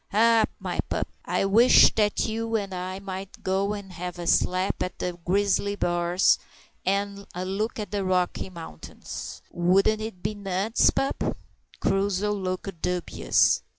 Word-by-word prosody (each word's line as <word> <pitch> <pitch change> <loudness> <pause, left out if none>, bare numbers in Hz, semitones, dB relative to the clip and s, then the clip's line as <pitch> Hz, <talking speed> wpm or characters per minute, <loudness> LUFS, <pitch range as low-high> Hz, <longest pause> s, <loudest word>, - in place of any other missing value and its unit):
"Ha! 225 +1 +5
my - - -4
pup, - - -1 0.2
I - - 0
wish 225 +6 +7
that 210 -1 +1
you 225 +1 -2
and 200 -3 -2
I 185 +1 -4
might 195 0 -7
go 195 +2 0
and 200 -3 -8
have 180 +1 -6
a 175 - -5
slap 185 +2 +1
at 180 - -3
the 180 -1 -3
grizzly 200 +2 +1
bars, 175 0 +2 0.4
and 200 +1 -1
a 180 +1 -3
look 205 +5 -2
at 210 -4 -5
the 205 -1 -1
Rocky 185 0 0
Mountains. 165 - -8
Wouldn't 195 +5 +3
it 215 -5 -6
be 210 +2 -1
nuts, 200 +2 +1
pup?" 270 - -1 0.4
Crusoe 195 +1 +1
looked 185 -2 -4
dubious. 180 -1 +2
195 Hz, 150 wpm, -26 LUFS, 180-205 Hz, 0.4 s, wish